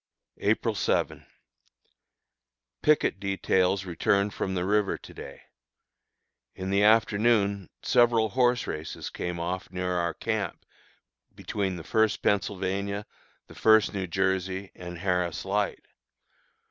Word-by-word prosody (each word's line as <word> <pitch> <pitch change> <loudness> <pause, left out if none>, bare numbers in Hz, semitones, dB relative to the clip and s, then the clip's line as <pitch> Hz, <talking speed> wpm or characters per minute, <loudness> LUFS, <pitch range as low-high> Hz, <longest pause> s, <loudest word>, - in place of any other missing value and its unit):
April - - +1
7. - - -1 1.5
Picket 150 -9 +3
details 95 -1 +1
returned 100 +3 +1
from 95 - -2
the 90 -1 -1
river 105 0 +1
to - - -13
day. - - -10 1.1
In 95 +1 -4
the 100 +1 +3
afternoon 105 -2 +3
several 115 -2 +4
horse 125 +1 +2
races 75 +1 -5
came 90 -1 -4
off 90 +2 -3
near 90 0 -3
our 85 -2 -1
camp, - - -3 0.7
between 95 -3 -2
the 85 - -7
First 110 +5 +1
Pennsylvania, 100 0 -1 0.4
the - - -14
First 110 -1 +4
New 95 -2 -3
Jersey, 95 +1 -1
and 90 -1 -8
Harris 90 -2 -1
Light. 100 +1 -1
95 Hz, 115 wpm, -27 LUFS, 90-105 Hz, 1.5 s, several